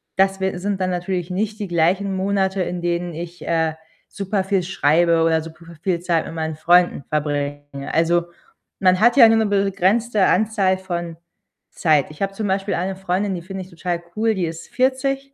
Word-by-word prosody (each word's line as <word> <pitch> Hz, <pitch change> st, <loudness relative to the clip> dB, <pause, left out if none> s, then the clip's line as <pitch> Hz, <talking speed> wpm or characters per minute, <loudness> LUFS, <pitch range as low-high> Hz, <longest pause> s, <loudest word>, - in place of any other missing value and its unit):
Das 195 Hz, 0 st, +2 dB
wir 190 Hz, -2 st, -2 dB
sind 200 Hz, 0 st, -2 dB
dann 185 Hz, -, +1 dB
natürlich 180 Hz, 0 st, -2 dB
nicht 210 Hz, +4 st, -2 dB
die 205 Hz, -, -3 dB
gleichen 180 Hz, +4 st, +1 dB
Monate, 190 Hz, 0 st, 0 dB
in 175 Hz, 0 st, -4 dB
denen 175 Hz, 0 st, -2 dB
ich, 175 Hz, +2 st, -8 dB
äh, 160 Hz, -1 st, +1 dB, 0.3 s
super 195 Hz, 0 st, -2 dB
viel 195 Hz, -2 st, +1 dB
schreibe 165 Hz, -1 st, +2 dB
oder 160 Hz, -1 st, +2 dB
super 165 Hz, +1 st, -12 dB
v 170 Hz, -, -12 dB
viel 180 Hz, -3 st, 0 dB
Zeit 170 Hz, -2 st, 0 dB
mit -, -, -7 dB
meinen 160 Hz, -1 st, -3 dB
Freunden 175 Hz, -2 st, +3 dB
verbringe. 145 Hz, -1 st, -2 dB, 0.3 s
Also, 170 Hz, +1 st, +2 dB, 0.6 s
man 185 Hz, 0 st, +4 dB
hat 240 Hz, +4 st, +4 dB
ja 230 Hz, -, +10 dB
nur 225 Hz, 0 st, +4 dB
'ne 220 Hz, -, +2 dB
begrenzte 200 Hz, +2 st, +2 dB
Anzahl 200 Hz, -4 st, +2 dB
von 170 Hz, -3 st, -5 dB, 0.5 s
Zeit. 155 Hz, -4 st, +2 dB
Ich 150 Hz, -, -14 dB
habe 195 Hz, 0 st, -1 dB
zum 210 Hz, +1 st, -3 dB
Beispiel 195 Hz, +1 st, -1 dB
eine 190 Hz, +2 st, -2 dB
Freundin, 190 Hz, +1 st, -1 dB
die 170 Hz, -, -5 dB
finde 190 Hz, 0 st, -6 dB
ich 185 Hz, -, -15 dB
total 175 Hz, -1 st, -3 dB
cool, 220 Hz, +1 st, +2 dB
die 180 Hz, -2 st, -1 dB
ist 165 Hz, 0 st, -7 dB
40 270 Hz, +2 st, 0 dB
185 Hz, 190 wpm, -21 LUFS, 170-200 Hz, 0.6 s, ja